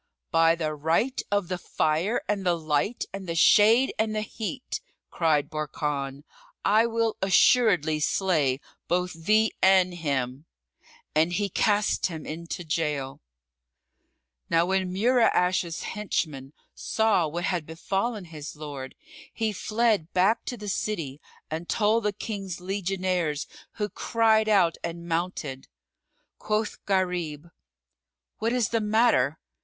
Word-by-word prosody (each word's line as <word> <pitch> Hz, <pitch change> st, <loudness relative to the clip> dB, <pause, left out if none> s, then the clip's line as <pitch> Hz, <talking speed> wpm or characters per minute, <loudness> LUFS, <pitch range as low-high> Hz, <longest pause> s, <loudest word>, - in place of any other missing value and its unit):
"By 165 Hz, -1 st, +4 dB
the 155 Hz, -2 st, -2 dB
right 165 Hz, -, 0 dB
of 205 Hz, -3 st, 0 dB
the 180 Hz, 0 st, -3 dB
Fire 165 Hz, +8 st, 0 dB
and 205 Hz, -2 st, -1 dB
the 175 Hz, -2 st, +2 dB
Light 155 Hz, +8 st, -1 dB
and 195 Hz, -2 st, -6 dB
the 165 Hz, -, -2 dB
Shade 220 Hz, +9 st, +5 dB
and 220 Hz, 0 st, 0 dB
the 215 Hz, -, -1 dB
Heat," 235 Hz, +4 st, -5 dB, 0.3 s
cried 155 Hz, -4 st, +2 dB
Barkan, 145 Hz, -2 st, -3 dB, 0.4 s
"I 215 Hz, +3 st, +4 dB
will 230 Hz, -1 st, 0 dB
assuredly 190 Hz, -, +4 dB
slay 150 Hz, -6 st, +1 dB, 0.3 s
both 180 Hz, +1 st, 0 dB
thee 215 Hz, +7 st, +2 dB
and 190 Hz, -1 st, +5 dB
him!" 140 Hz, -4 st, -2 dB, 0.7 s
And 160 Hz, +3 st, +2 dB
he 205 Hz, +2 st, 0 dB
cast 210 Hz, +3 st, +2 dB
him 160 Hz, -4 st, -7 dB
into 170 Hz, +2 st, -6 dB
gaol. 150 Hz, -4 st, -2 dB, 1.3 s
Now 165 Hz, 0 st, +3 dB
when 190 Hz, 0 st, 0 dB
Mura'ash's 185 Hz, -5 st, +2 dB
henchman 150 Hz, -9 st, -3 dB, 0.2 s
saw 215 Hz, -7 st, +1 dB
what 170 Hz, +3 st, -4 dB
had 175 Hz, -4 st, -1 dB
befallen 195 Hz, +6 st, -2 dB
his 155 Hz, -2 st, -8 dB
lord, 145 Hz, -3 st, -7 dB, 0.4 s
he 220 Hz, -2 st, -1 dB
fled 215 Hz, -4 st, 0 dB
back 195 Hz, +5 st, +2 dB
to 245 Hz, -, -4 dB
the 210 Hz, -, -8 dB
city 165 Hz, -9 st, -3 dB, 0.3 s
and 165 Hz, +2 st, -4 dB
told 220 Hz, 0 st, +2 dB
the 210 Hz, -, +2 dB
King's 195 Hz, -3 st, -5 dB
legionaries 180 Hz, -4 st, -1 dB, 0.3 s
who 210 Hz, -, -2 dB
cried 220 Hz, +1 st, +2 dB
out 185 Hz, -6 st, +3 dB
and 170 Hz, 0 st, -5 dB
mounted. 165 Hz, -6 st, -3 dB, 0.7 s
Quoth 215 Hz, 0 st, -2 dB
Gharib, 175 Hz, -5 st, -1 dB, 0.9 s
"What 225 Hz, +2 st, 0 dB
is 245 Hz, -4 st, +1 dB
the 230 Hz, -1 st, 0 dB
matter?" 210 Hz, -, +3 dB
180 Hz, 130 wpm, -26 LUFS, 160-210 Hz, 1.3 s, Shade